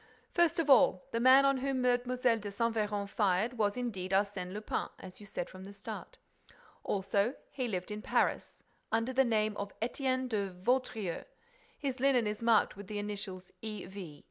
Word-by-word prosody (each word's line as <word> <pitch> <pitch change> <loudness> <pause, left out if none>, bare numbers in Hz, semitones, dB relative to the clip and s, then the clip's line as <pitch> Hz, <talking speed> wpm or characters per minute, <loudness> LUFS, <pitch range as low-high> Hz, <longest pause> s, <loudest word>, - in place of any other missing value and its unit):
First 345 -3 +3
of 330 -3 +1
all, 240 -9 +6
the 230 - 0
man 260 +3 +7
on 275 -1 +4
whom 265 -1 -1
Mlle. 245 -1 +4
de 250 +1 -3 0.3
Saint 230 +3 0
Véran 210 -2 -1
fired 210 +4 +1
was 205 +1 +2
indeed 205 -7 -3
Arsène 195 -2 0
Lupin, 210 +2 -2
as 185 - -10
you 205 - -11
said 180 - -4
from 185 0 -11
the 200 +1 -9
start. 200 - -8 0.7
Also, 200 +5 0 0.2
he 255 -3 -2
lived 185 -3 -3
in 210 0 -4
Paris - - 0 0.3
under 225 +3 +1
the 265 +1 +5
name 215 -3 +1
of 200 0 -6
Étienne 255 +2 0
de 205 -5 -1
Vaudreix. 200 -1 -1 0.5
His 270 -3 -3
linen 260 -3 +4
is 210 +1 -3
marked 230 -2 +4
with 200 0 -9
the 210 - -4
initials 200 -3 -5
E. 215 -3 -5
V. 180 -6 -9
215 Hz, 180 wpm, -32 LUFS, 200-250 Hz, 0.7 s, man